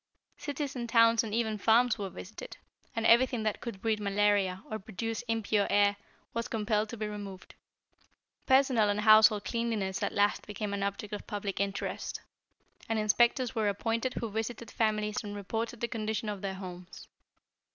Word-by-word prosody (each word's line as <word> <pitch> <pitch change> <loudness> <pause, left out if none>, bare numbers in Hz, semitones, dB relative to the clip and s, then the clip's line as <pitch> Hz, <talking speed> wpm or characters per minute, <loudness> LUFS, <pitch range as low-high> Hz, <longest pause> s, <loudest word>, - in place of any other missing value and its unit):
Cities 290 -1 -4
and 240 -2 -4
towns 230 0 +5
and 220 - -5
even 220 -1 -1
farms 230 +3 +4
were 195 -2 -3
visited, 220 - -9 0.4
and 225 0 -1
everything 240 0 +4
that 215 -1 -1
could 215 -6 -7
breed 220 -2 +1
malaria, 200 -2 +1
or 215 - -4
produce 220 +2 -4
impure 220 -2 +1
air, 205 0 +4 0.4
was 230 +1 -2
compelled 215 -2 0
to 235 - -6
be 215 - -3
removed. 205 -3 -7 0.9
Personal 260 -5 +4
and 205 +1 0
household 215 -1 +6
cleanliness 225 -5 -1
at - - 0
last 205 0 +1
became 210 0 -4
an 200 - -2
object 200 +1 -3
of 205 - -6
public 205 -2 -4
interest, 200 0 -3 0.7
and 225 - +1
inspectors 235 +4 +2
were 220 -3 +1
appointed 230 +5 -1
who 230 -3 -3
visited 225 +1 -4
families 215 -1 0
and 205 -1 -6
reported 225 +3 -4
the 235 - 0
condition 220 -1 -3
of 205 -2 -5
their 195 -1 -3
homes. 180 -1 -9
215 Hz, 165 wpm, -30 LUFS, 205-230 Hz, 0.9 s, household